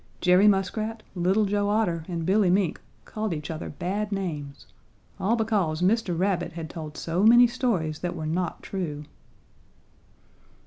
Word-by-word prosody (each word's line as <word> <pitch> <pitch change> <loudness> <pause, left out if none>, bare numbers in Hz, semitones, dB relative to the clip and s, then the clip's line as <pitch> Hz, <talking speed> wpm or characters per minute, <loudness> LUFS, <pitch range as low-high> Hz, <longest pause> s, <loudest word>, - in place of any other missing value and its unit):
Jerry 180 +3 +5
Muskrat, 215 +3 0
Little 190 +4 +2
Joe 205 0 0
Otter, 180 -7 0
and 170 -3 -3
Billy 195 +1 +3
Mink 185 -2 +1 0.2
called 215 -5 -3
each 150 +1 -5
other 160 +1 -5
bad 205 +7 -3
names. 155 -8 -4 0.5
All 215 +5 +2
because 200 -8 0
Mr. 190 -3 +1
Rabbit 185 -2 0
had 165 -1 -6
told 155 -2 -7
so 170 +2 -1
many 240 +3 +8
stories 195 - -1
that 175 -1 -3
were 160 -2 -5
not 170 +2 -2
true. 150 -6 -4
185 Hz, 145 wpm, -26 LUFS, 165-210 Hz, 0.5 s, many